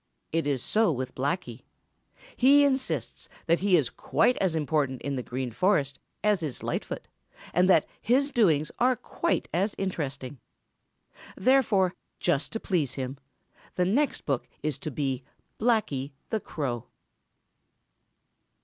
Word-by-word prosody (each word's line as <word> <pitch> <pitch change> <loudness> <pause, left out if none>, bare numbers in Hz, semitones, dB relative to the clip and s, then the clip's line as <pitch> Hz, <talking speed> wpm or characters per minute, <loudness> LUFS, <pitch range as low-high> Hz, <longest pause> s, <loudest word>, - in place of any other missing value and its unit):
It 165 -2 0
is 135 -4 0
so 220 -3 +3
with 130 -2 -3
Blacky. 130 -3 -2 0.7
He 280 +3 +6
insists 265 -2 -1 0.2
that 170 0 +3
he 190 -2 +4
is 145 -7 0
quite 250 - +2
as 185 -4 +1
important 145 -4 0
in 140 -1 -2
the 130 - -2
Green 125 0 -4
Forest 145 - +1 0.2
as 210 -4 +3
is 150 -6 -4
Lightfoot - - -3 0.5
and 180 +2 +4
that 165 -5 +5 0.2
his 275 +5 +2
doings 160 - +3
are 255 +1 +4
quite - - -1
as 195 +5 +1
interesting. 140 -8 -4 1.0
Therefore 210 -7 +3 0.3
just 165 -5 0
to 225 - -2
please 155 - 0
him 130 0 -4 0.6
the 180 - +2
next 265 +10 +1
book 135 -4 -1 0.2
is 150 -3 -1
to 155 - -4
be 135 -2 -2 0.4
Blacky 180 - +1 0.2
the 220 - +1
Crow. 135 - -4
160 Hz, 135 wpm, -28 LUFS, 135-210 Hz, 1.0 s, He